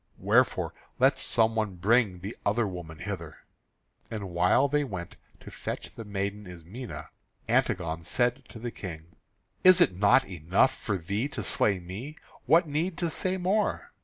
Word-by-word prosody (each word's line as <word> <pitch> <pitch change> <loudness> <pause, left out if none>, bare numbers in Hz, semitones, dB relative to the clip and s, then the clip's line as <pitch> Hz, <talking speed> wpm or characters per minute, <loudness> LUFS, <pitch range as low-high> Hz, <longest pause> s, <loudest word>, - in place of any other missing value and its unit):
Wherefore - - +2 0.2
let - - +4
some 115 -1 +2
one 110 -4 -1
bring 100 -1 +2
the 100 +5 -6
other 105 +3 +2
woman 85 -4 -7
hither." 85 -3 -6 0.7
And 100 -5 -5
while 90 +10 +3
they 145 +1 +1
went 95 -10 -6 0.3
to - - -11
fetch - - -6
the 115 - -8
maiden 100 0 -3
Ismené, 90 +8 -8 0.4
Antigone 85 -2 0
said 125 +8 0
to - - -10
the 120 +1 -5
King: 85 -5 -9 0.5
"Is 185 0 +8
it 95 - +4
not 105 +8 +5
enough 90 - +1
for 105 -3 -2
thee 100 +9 -2
to - - -5
slay 100 -2 +2
me? 100 - -8 0.3
What 165 +5 +5
need 160 +4 -1
to 170 0 -1
say 185 +4 -1
more? 195 +4 0
105 Hz, 160 wpm, -28 LUFS, 90-130 Hz, 0.7 s, Is